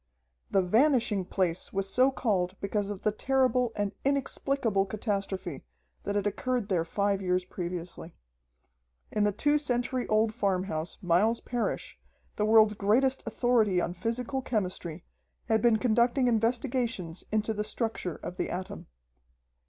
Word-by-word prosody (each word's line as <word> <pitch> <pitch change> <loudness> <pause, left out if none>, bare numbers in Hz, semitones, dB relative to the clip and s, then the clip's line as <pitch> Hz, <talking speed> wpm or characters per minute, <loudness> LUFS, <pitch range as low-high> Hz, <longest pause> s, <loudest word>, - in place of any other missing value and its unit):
The 195 - +3
"Vanishing 225 -1 +3
Place" 180 -2 -1
was 195 0 -1
so 255 +7 +4
called 195 -8 -1
because 200 0 -2
of 205 -2 -6
the 215 - +2
terrible 250 +1 +1
and 205 -1 -1
inexplicable 270 -6 0
catastrophe 195 - -3 0.4
that 205 - -2
had 205 -1 0
occurred 235 +2 -1
there 175 -4 +2
five 200 +3 0
years 180 -1 0
previously. 175 -2 -6 1.0
In 210 -1 +1
the 205 - +3
two 290 +9 +2
century 250 -2 -1
old 215 0 +2
farmhouse, 185 -6 -2
Miles 195 +7 +3
Parrish, 245 -2 -3 0.4
the 210 - 0
world's 215 -1 +6
greatest 240 +7 +2
authority 225 -7 +2
on 175 - -1
physical 235 +7 -2
chemistry, 185 -8 -3 0.4
had 220 -2 +2
been 235 -1 +4
conducting 240 +3 +2
investigations 230 -6 0
into 215 +1 +1
the 210 0 -2
structure 215 -6 -3
of 180 - -8
the - - -2
atom. 185 +1 -6
210 Hz, 135 wpm, -29 LUFS, 190-245 Hz, 1.0 s, world's